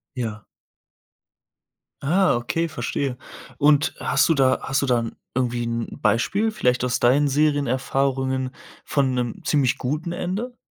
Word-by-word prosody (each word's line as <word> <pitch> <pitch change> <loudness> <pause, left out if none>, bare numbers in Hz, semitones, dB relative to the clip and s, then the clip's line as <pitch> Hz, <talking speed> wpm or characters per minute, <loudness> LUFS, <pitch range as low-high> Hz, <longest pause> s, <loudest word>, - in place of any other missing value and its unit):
Ja. 110 -4 -4 1.6
Ah, 180 +5 +3
okay, 165 +8 -1
verstehe. 130 -2 -3 0.4
Und, 145 +1 +3
hast - - +2
du - - +5
da 130 -2 +3
hast 135 - 0
du 140 - 0
da 125 -2 +2
'n 115 -1 -6 0.2
irgendwie 120 -2 0
'n 115 0 -2
Beispiel, 200 - +1
vielleicht 125 - +1
aus 125 0 0
deinen 140 +4 +3
Serienerfahrungen 135 -2 0 0.3
von 135 -3 +1
'nem 125 -2 -3
ziemlich 140 -5 +2
guten 150 +6 -3
Ende? 210 +9 -4
135 Hz, 135 wpm, -23 LUFS, 125-150 Hz, 1.6 s, du